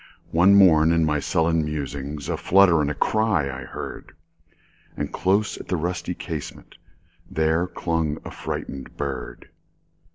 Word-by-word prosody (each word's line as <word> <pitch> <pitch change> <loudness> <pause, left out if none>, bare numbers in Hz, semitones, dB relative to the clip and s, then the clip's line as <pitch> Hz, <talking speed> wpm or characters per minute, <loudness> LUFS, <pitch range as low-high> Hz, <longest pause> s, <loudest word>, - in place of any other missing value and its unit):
One 90 +4 +5
morn, 80 -5 +6
in 85 -1 +3
my 75 -1 +1
sullen 80 +2 +1
musings,A 70 -1 -4
flutter 90 -4 +4
and 75 0 -2
cry 110 -8 +2
I 65 0 -7
heard; - - -8 0.8
And - - -4
close 100 +3 +1
at - - -10
the 90 - -1
rusty 85 +2 -3
casementThere 80 +3 -4
clung 80 -3 -1
a - - -7
frightened 70 -1 -6
bird. 70 -2 -5
80 Hz, 125 wpm, -23 LUFS, 75-90 Hz, 0.8 s, morn